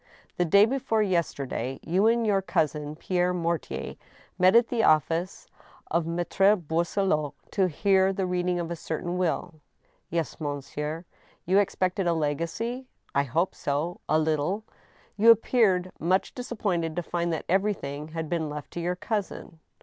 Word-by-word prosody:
" -, -, -34 dB
The 175 Hz, -, +3 dB
day 200 Hz, +5 st, +6 dB
before 225 Hz, -3 st, 0 dB
yesterday 140 Hz, -, -2 dB
you 185 Hz, +6 st, +2 dB
and 230 Hz, 0 st, +3 dB
your 200 Hz, -2 st, +2 dB
cousin, 150 Hz, -4 st, -1 dB
Pierre 180 Hz, +2 st, 0 dB
Mortier, 170 Hz, -2 st, -3 dB, 0.4 s
met 185 Hz, +3 st, +5 dB
at 235 Hz, 0 st, +5 dB
the 235 Hz, -2 st, +1 dB
office 165 Hz, +2 st, +2 dB, 0.5 s
of 165 Hz, 0 st, +1 dB
Maltre 175 Hz, +4 st, +3 dB
Boisselot, 165 Hz, -2 st, 0 dB, 0.2 s
to 190 Hz, -2 st, +2 dB
hear 190 Hz, +3 st, +3 dB
the 195 Hz, 0 st, -1 dB
reading 180 Hz, 0 st, 0 dB
of 170 Hz, 0 st, -4 dB
a -, -, -2 dB
certain 165 Hz, +2 st, -4 dB
will?" 175 Hz, -1 st, -1 dB, 0.6 s
"Yes, 165 Hz, -2 st, -2 dB
monsieur," 150 Hz, +3 st, -4 dB, 0.4 s
You 190 Hz, +3 st, +4 dB
expected 190 Hz, -1 st, 0 dB
a 170 Hz, -, +3 dB
legacy? 170 Hz, -, -2 dB
" -, -, -36 dB
"I 140 Hz, 0 st, +2 dB
hoped 165 Hz, +8 st, 0 dB
so,... 150 Hz, +5 st, -2 dB
a 155 Hz, -, +4 dB
little." 155 Hz, +6 st, 0 dB, 0.3 s
" -, -, -32 dB
You 220 Hz, +3 st, +6 dB
appeared 210 Hz, -6 st, +4 dB
much 185 Hz, +3 st, +1 dB
disappointed 195 Hz, -10 st, -2 dB
to 175 Hz, -, -2 dB
find 170 Hz, 0 st, -2 dB
that 160 Hz, -, -3 dB
everything 170 Hz, -7 st, -1 dB
had 160 Hz, 0 st, -5 dB
been 160 Hz, -2 st, -1 dB
left 150 Hz, -1 st, -7 dB
to -, -, -5 dB
your 175 Hz, +1 st, -1 dB
cousin 190 Hz, -4 st, -4 dB
175 Hz, 160 wpm, -27 LUFS, 160-195 Hz, 0.6 s, day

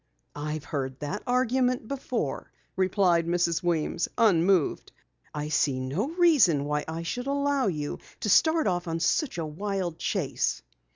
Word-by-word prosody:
"I've 150 Hz, 0 st, -4 dB
heard 130 Hz, -3 st, -4 dB
that 150 Hz, +8 st, -3 dB
argument 250 Hz, -1 st, +1 dB
before," 250 Hz, -, -3 dB, 0.2 s
replied 185 Hz, -3 st, +2 dB
Mrs. 170 Hz, -1 st, +1 dB
Weems, 170 Hz, -1 st, 0 dB
unmoved. 190 Hz, -6 st, +2 dB, 0.4 s
"I 150 Hz, 0 st, -4 dB
see 145 Hz, -3 st, +1 dB
no 140 Hz, -, -2 dB
reason 275 Hz, -, +4 dB
why 150 Hz, 0 st, -1 dB
I 165 Hz, +1 st, -4 dB
should 245 Hz, +9 st, -4 dB
allow 280 Hz, -2 st, +1 dB
you 150 Hz, -5 st, -3 dB, 0.2 s
to -, -, -2 dB
start 320 Hz, -, +4 dB
off 175 Hz, -2 st, -1 dB
on 165 Hz, 0 st, -2 dB
such 265 Hz, -, 0 dB
a 165 Hz, -, -2 dB
wild 180 Hz, +1 st, -3 dB
chase." -, -, -1 dB
175 Hz, 140 wpm, -27 LUFS, 155-245 Hz, 0.4 s, reason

